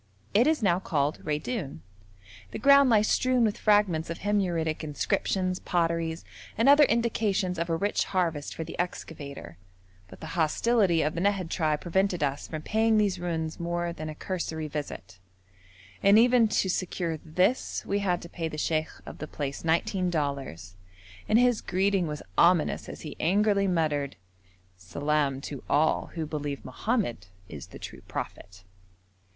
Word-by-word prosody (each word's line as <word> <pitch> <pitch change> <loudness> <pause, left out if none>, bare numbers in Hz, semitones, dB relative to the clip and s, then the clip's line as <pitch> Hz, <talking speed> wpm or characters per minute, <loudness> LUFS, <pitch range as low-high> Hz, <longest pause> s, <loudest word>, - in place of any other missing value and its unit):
It 230 +7 +5
is 310 -6 +1
now 180 -3 +3
called 150 -4 -1
Raidoun. 150 - -3 0.7
The - - -6
ground 280 -1 +6
lies 215 -2 +4
strewn 255 -1 +2
with 215 -2 0
fragments 205 -7 +2
of 170 - -5
Himyaritic 175 -7 0
inscriptions, 185 +5 -1
pottery, 165 -2 0 0.4
and 230 - +3
other 290 +1 +8
indications 210 -6 0
of 170 +1 -2
a 165 - +1
rich 200 +5 0
harvest 165 -6 -1
for 160 - -4
the - - -9
excavator, 140 - -6 0.5
but - - -13
the 160 - -7
hostility 175 +2 +2
of 150 +1 0
the 170 - -3
Nahad 195 -3 0
tribe 155 -3 0
prevented 180 -1 0
us 140 0 -2
from 155 -1 -6
paying 220 0 +2
these 200 -4 +1
ruins 165 -2 -3
more 170 0 -2
than 155 -1 -6
a 155 - -7
cursory 160 -3 -4
visit, 120 - -6 0.8
and 200 +2 +6
even 240 0 +5
to 200 - +1
secure 175 -3 -2
this 185 +10 0
we 200 - 0
had 180 -3 0
to - - -8
pay 165 -2 -4
the 155 - -7
sheikh 155 0 0 0.2
of - - -10
the 155 - -5
place 140 -2 -5
nineteen 180 +3 +1
dollars, 135 - -3 0.5
and 215 - +5
his 245 -2 +3
greeting 190 -1 +1
was 150 -1 -5 0.2
ominous 170 -3 +3
as - - -8
he 155 - -7
angrily 200 +3 +2
muttered, 150 -6 0 0.6
'Salaam 140 +8 -1
to 140 -2 -7
all 155 +2 +2
who 160 -2 -2
believe 145 -2 -4
Mohammed 130 - -2 0.2
is 75 -6 -9
the - - -11
true - - -9
prophet.' 95 -1 -7
170 Hz, 160 wpm, -27 LUFS, 150-200 Hz, 0.8 s, other